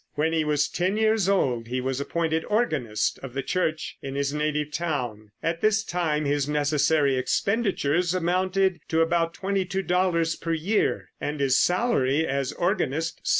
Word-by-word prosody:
When 160 Hz, +2 st, +1 dB
he 160 Hz, -1 st, +2 dB
was 150 Hz, -1 st, +1 dB
ten 185 Hz, +4 st, -1 dB
years 220 Hz, -3 st, +2 dB
old 125 Hz, -12 st, +1 dB
he 125 Hz, +2 st, -2 dB
was 130 Hz, +1 st, -2 dB
appointed 160 Hz, +1 st, -1 dB
organist 140 Hz, -, 0 dB
of 135 Hz, -2 st, -9 dB
the 135 Hz, -, -2 dB
Church 160 Hz, 0 st, -2 dB
in 135 Hz, 0 st, -6 dB
his 140 Hz, 0 st, -1 dB
native 150 Hz, 0 st, -1 dB
town. 125 Hz, -11 st, -3 dB
At 165 Hz, 0 st, -1 dB
this 215 Hz, 0 st, +3 dB
time 160 Hz, -6 st, -1 dB
his 145 Hz, 0 st, 0 dB
necessary 145 Hz, -1 st, +2 dB
expenditures 180 Hz, -, 0 dB
amounted 185 Hz, +1 st, +1 dB
to 160 Hz, 0 st, +2 dB
about 165 Hz, 0 st, +1 dB
$22 185 Hz, -3 st, 0 dB
per 165 Hz, -, -1 dB
year, 180 Hz, +7 st, 0 dB
and 145 Hz, 0 st, -3 dB
his 135 Hz, -1 st, +3 dB
salary 160 Hz, -, +2 dB
as 135 Hz, -2 st, -1 dB
organist 165 Hz, -4 st, -1 dB
$7. -, -, -38 dB
160 Hz, 155 wpm, -25 LUFS, 140-185 Hz, -, this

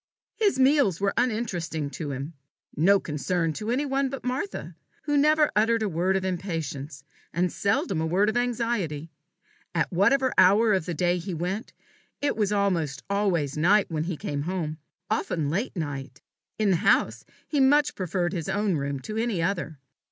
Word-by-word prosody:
His 410 Hz, -9 st, +1 dB
meals 265 Hz, -, +4 dB
were 200 Hz, 0 st, +1 dB
uninteresting 185 Hz, -, -1 dB
to 150 Hz, -2 st, -5 dB
him 140 Hz, +4 st, -5 dB, 0.4 s
no 195 Hz, +6 st, +4 dB
concern 160 Hz, +2 st, -1 dB
to 215 Hz, +7 st, -5 dB
any 260 Hz, +5 st, +1 dB
one 270 Hz, 0 st, 0 dB
but 275 Hz, 0 st, -6 dB
Martha, 260 Hz, +11 st, -4 dB, 0.3 s
who 295 Hz, -1 st, 0 dB
never 300 Hz, +1 st, +4 dB
uttered 225 Hz, +1 st, +3 dB
a -, -, +1 dB
word 185 Hz, +2 st, +1 dB
of 190 Hz, -, -3 dB
impatience, 160 Hz, -7 st, -4 dB, 0.3 s
and 180 Hz, +1 st, 0 dB
seldom 195 Hz, -4 st, 0 dB
a 160 Hz, -, 0 dB
word 190 Hz, +5 st, +2 dB
of 220 Hz, -, 0 dB
anxiety. 230 Hz, -11 st, -1 dB, 0.6 s
At -, -, 0 dB
whatever 260 Hz, +9 st, +3 dB
hour 210 Hz, +4 st, +6 dB
of 185 Hz, -4 st, 0 dB
the 175 Hz, -, -2 dB
day 175 Hz, +2 st, +1 dB
he 180 Hz, +1 st, -5 dB
went, 185 Hz, +8 st, -3 dB, 0.5 s
it 290 Hz, -, 0 dB
was 210 Hz, -2 st, 0 dB
almost 175 Hz, -9 st, 0 dB
always 180 Hz, -9 st, +1 dB
night 185 Hz, +6 st, +3 dB
when 155 Hz, 0 st, -1 dB
he 175 Hz, -2 st, -3 dB
came 145 Hz, 0 st, -3 dB
home, 160 Hz, -2 st, -3 dB, 0.3 s
often 170 Hz, -8 st, -1 dB
late 210 Hz, +10 st, -2 dB
night. 135 Hz, -4 st, -5 dB, 0.3 s
In 215 Hz, -2 st, +2 dB
the 180 Hz, -, +3 dB
house 110 Hz, -6 st, +2 dB, 0.2 s
he 295 Hz, -, 0 dB
much 285 Hz, +2 st, +4 dB
preferred 180 Hz, -1 st, -2 dB
his 170 Hz, -1 st, -3 dB
own 200 Hz, -3 st, +1 dB
room 140 Hz, -1 st, -3 dB
to 215 Hz, +10 st, -6 dB
any 225 Hz, -5 st, 0 dB
other. 165 Hz, -3 st, -2 dB
190 Hz, 175 wpm, -26 LUFS, 160-225 Hz, 0.6 s, hour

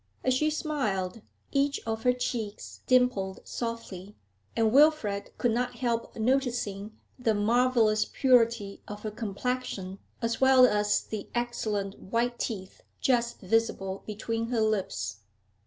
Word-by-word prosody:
As 255 Hz, -, +3 dB
she 305 Hz, +4 st, +2 dB
smiled, 235 Hz, -, -2 dB, 0.3 s
each 280 Hz, 0 st, +1 dB
of 225 Hz, 0 st, -2 dB
her 250 Hz, -, +4 dB
cheeks 240 Hz, -4 st, -4 dB
dimpled 250 Hz, -7 st, +2 dB
softly, 210 Hz, -5 st, -6 dB, 0.4 s
and 225 Hz, -1 st, +3 dB
Wilfrid 275 Hz, -9 st, +4 dB
could 240 Hz, -, +2 dB
not 245 Hz, +2 st, -1 dB
help 235 Hz, -2 st, -2 dB
noticing 220 Hz, -4 st, -1 dB, 0.2 s
the 225 Hz, -3 st, +2 dB
marvellous 225 Hz, 0 st, +3 dB
purity 235 Hz, -6 st, +2 dB
of 210 Hz, 0 st, -8 dB
her 215 Hz, -, -3 dB
complexion, 210 Hz, -2 st, -3 dB, 0.2 s
as 230 Hz, 0 st, -2 dB
well 265 Hz, -1 st, +7 dB
as 210 Hz, -3 st, +2 dB
the 215 Hz, -2 st, -6 dB
excellent 215 Hz, -5 st, -2 dB
white 235 Hz, +4 st, -1 dB
teeth 190 Hz, -4 st, -4 dB, 0.2 s
just 240 Hz, -2 st, +1 dB
visible 195 Hz, -2 st, 0 dB
between 225 Hz, +2 st, -3 dB
her 235 Hz, -2 st, 0 dB
lips. 145 Hz, -, -1 dB
230 Hz, 125 wpm, -28 LUFS, 205-250 Hz, 0.4 s, well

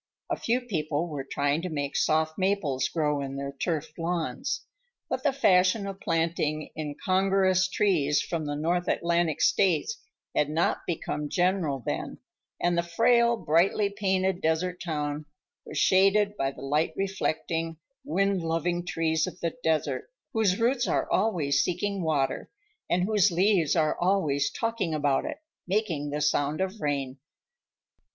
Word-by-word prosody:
A -, -, +2 dB
few 240 Hz, +2 st, 0 dB
people 160 Hz, -8 st, -2 dB
were 145 Hz, -3 st, -4 dB
trying 145 Hz, +3 st, 0 dB
to 180 Hz, -, -4 dB
make 145 Hz, -3 st, -3 dB
soft 155 Hz, 0 st, +2 dB
maples 170 Hz, -10 st, 0 dB
grow 150 Hz, -3 st, 0 dB
in 135 Hz, 0 st, -5 dB
their 140 Hz, 0 st, -4 dB
turfed 155 Hz, +2 st, -3 dB
lawns, 165 Hz, -1 st, -2 dB, 0.5 s
but -, -, -2 dB
the 290 Hz, -, +2 dB
fashion 195 Hz, -5 st, +3 dB
of 195 Hz, -1 st, -6 dB
planting 165 Hz, -3 st, -1 dB
incongruous 185 Hz, +4 st, +1 dB
trees 160 Hz, -8 st, +2 dB
from 165 Hz, -3 st, -3 dB
the 145 Hz, 0 st, -2 dB
North 170 Hz, +4 st, 0 dB
Atlantic 170 Hz, -2 st, +1 dB
States 195 Hz, -, +2 dB, 0.3 s
had 150 Hz, -, +2 dB
not 160 Hz, +3 st, 0 dB
become 150 Hz, -3 st, -3 dB
general 175 Hz, -8 st, 0 dB
then, -, -, -3 dB, 0.4 s
and 175 Hz, 0 st, +1 dB
the 170 Hz, -, +3 dB
frail, 235 Hz, +7 st, +3 dB
brightly 195 Hz, +4 st, +2 dB
painted 190 Hz, -2 st, 0 dB
desert 175 Hz, +3 st, 0 dB
town 150 Hz, -2 st, -3 dB, 0.4 s
was -, -, -6 dB
shaded 200 Hz, +2 st, +4 dB
by 135 Hz, -7 st, 0 dB
the 135 Hz, -, -10 dB
light 150 Hz, +4 st, +1 dB
reflecting, 165 Hz, -4 st, -2 dB, 0.3 s
wind 195 Hz, -8 st, +1 dB
loving 165 Hz, +1 st, -1 dB
trees 160 Hz, -2 st, 0 dB
of -, -, -8 dB
the 170 Hz, -, -2 dB
desert, 160 Hz, -, 0 dB, 0.2 s
whose 210 Hz, -3 st, +2 dB
roots 245 Hz, +2 st, +2 dB
are -, -, 0 dB
always 155 Hz, -10 st, +2 dB
seeking 195 Hz, +2 st, -1 dB
water 150 Hz, -5 st, 0 dB, 0.4 s
and 180 Hz, +1 st, +2 dB
whose 205 Hz, 0 st, +3 dB
leaves 180 Hz, -2 st, +2 dB
are 155 Hz, -2 st, +2 dB
always 165 Hz, -7 st, +2 dB
talking 225 Hz, -8 st, -2 dB
about 145 Hz, -2 st, +1 dB
it, -, -, -4 dB, 0.3 s
making 180 Hz, -7 st, -1 dB
the 150 Hz, +1 st, -3 dB
sound 145 Hz, +1 st, +1 dB
of 190 Hz, +3 st, -2 dB
rain. 140 Hz, -2 st, -2 dB
170 Hz, 145 wpm, -27 LUFS, 150-195 Hz, 0.5 s, shaded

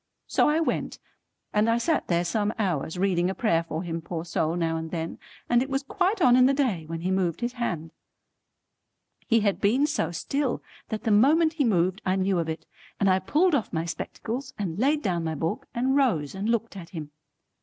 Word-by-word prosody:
So -, -, +3 dB
I 305 Hz, +2 st, +2 dB
went, 330 Hz, -, -1 dB, 0.6 s
and 215 Hz, +2 st, +3 dB
I 230 Hz, -, +3 dB
sat 315 Hz, +6 st, 0 dB
there 175 Hz, 0 st, +1 dB
some 205 Hz, +4 st, 0 dB
hours, 180 Hz, -6 st, -1 dB
reading 180 Hz, -2 st, +2 dB
a 190 Hz, -, -3 dB
prayer 170 Hz, -8 st, +2 dB
for 165 Hz, +1 st, -4 dB
him 165 Hz, -1 st, -4 dB
poor 165 Hz, 0 st, -5 dB
soul 165 Hz, -1 st, 0 dB
now 165 Hz, -2 st, 0 dB
and 160 Hz, 0 st, -4 dB
then, 165 Hz, -1 st, -4 dB, 0.3 s
and 240 Hz, 0 st, +4 dB
it 265 Hz, -, -2 dB
was 270 Hz, +1 st, -1 dB
quite 370 Hz, +6 st, 0 dB
on 245 Hz, -1 st, +7 dB
in 255 Hz, 0 st, +6 dB
the 275 Hz, -, +2 dB
day 215 Hz, -, 0 dB
when 165 Hz, 0 st, -5 dB
he 185 Hz, +2 st, -1 dB
moved 185 Hz, -2 st, 0 dB
his 240 Hz, +1 st, -1 dB
hand. 170 Hz, -10 st, -3 dB, 1.3 s
He 230 Hz, -2 st, +4 dB
had 200 Hz, -2 st, 0 dB
been 245 Hz, +8 st, +3 dB
so 300 Hz, +1 st, 0 dB
still, 265 Hz, -, -2 dB, 0.3 s
that 220 Hz, -2 st, -4 dB
the 225 Hz, -, +1 dB
moment 310 Hz, +10 st, +5 dB
he 310 Hz, -3 st, +1 dB
moved 185 Hz, -5 st, +1 dB
I 185 Hz, 0 st, +1 dB
knew 190 Hz, -1 st, +1 dB
of 165 Hz, -1 st, -2 dB
it, 160 Hz, -, -5 dB, 0.3 s
and 195 Hz, -2 st, +4 dB
I 185 Hz, -, +3 dB
pulled 310 Hz, -, +2 dB
off 265 Hz, -7 st, 0 dB
my 165 Hz, 0 st, -1 dB
spectacles 245 Hz, +9 st, -5 dB
and 185 Hz, -3 st, -3 dB
laid 290 Hz, +5 st, +2 dB
down 175 Hz, -4 st, 0 dB
my 160 Hz, -1 st, -2 dB
book 165 Hz, -, -3 dB
and 260 Hz, +3 st, +1 dB
rose 180 Hz, -, +2 dB
and 195 Hz, +3 st, -3 dB
looked 230 Hz, -2 st, 0 dB
at 175 Hz, -3 st, -8 dB
him. 155 Hz, -4 st, -7 dB
200 Hz, 215 wpm, -26 LUFS, 170-255 Hz, 1.3 s, on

